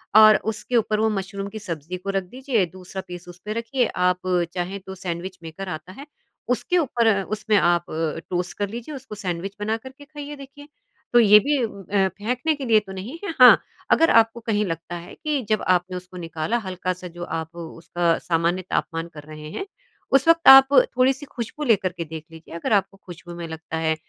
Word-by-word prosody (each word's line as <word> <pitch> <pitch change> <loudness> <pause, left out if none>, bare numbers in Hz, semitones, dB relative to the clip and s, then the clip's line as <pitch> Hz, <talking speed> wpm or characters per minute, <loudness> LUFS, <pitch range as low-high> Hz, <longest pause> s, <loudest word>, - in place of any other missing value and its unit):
और 215 0 +9 0.2
उसके 235 +3 -5
ऊपर 215 -2 +2
वो 220 0 +3
मशरूम 195 0 -4
की 220 +1 -7
सब्ज़ी 175 -2 -5
को 195 +2 -7
रख 195 -1 0
दीजिए, 245 0 -1
दूसरा 185 +2 -8
पीस 180 0 -9
उस 175 0 -12
पे 210 - -3
रखिए 230 +2 0
आप 180 0 +1 0.3
चाहें 185 +2 -3
तो 190 0 -9
सैंडविच 180 +1 -5
मेकर 165 +4 -7
आता 155 +1 -7
है 280 - -8 0.5
उसके 355 +8 +1
ऊपर 240 -8 +2
उसमें 215 +1 -1
आप 175 -2 +3 0.4
टोस्ट 180 -1 -3
कर 205 -1 -1
लीजिए 240 +7 -7
उसको 260 -5 -9
सैंडविच 190 -1 -4
बना 215 +2 0
कर 260 +4 -11
के 285 - -13
खाइए 295 0 -8
देखिए। 280 +1 -12 0.5
तो 240 - +7
ये 210 -2 +8
भी 290 +6 +1
अ, 200 -2 0
फेंकने 250 +9 0
के 280 -2 -6
लिए 225 -3 +5
तो 200 -2 -11
नहीं 205 - -7
है 365 - -3
हाँ, 250 -1 +10 0.3
अगर 330 +1 +5
आपको 225 +1 +4
कहीं 215 -3 0
लगता 165 0 -5
है 170 0 -9
कि 300 -3 -2
जब 215 - +2
आपने 180 0 +1
उसको 180 0 -11
निकाला 165 +5 -2
हल्का-सा 185 0 -4
जो 175 0 -8
आप 165 -1 -5
उसका 170 0 -1
सामान्य 170 +2 0
तापमान 165 0 -2
कर 150 -1 -10
रहे 155 0 -10
हैं, 390 - -4 0.5
उस 275 +2 +4
वक़्त 330 0 +4
आप 270 0 +11
थोड़ी-सी 265 +2 +3
खुशबू 255 +3 -6
लेकर 210 -8 +2
के 170 - -3
देख 160 0 -8
लीजिए 165 0 -12
अगर 170 +6 -1
आपको 195 -1 +1
खुशबू 175 -1 -10
में 170 -1 -6
लगता 160 0 -6
है 160 -1 +1
195 Hz, 200 wpm, -23 LUFS, 175-235 Hz, 0.5 s, आप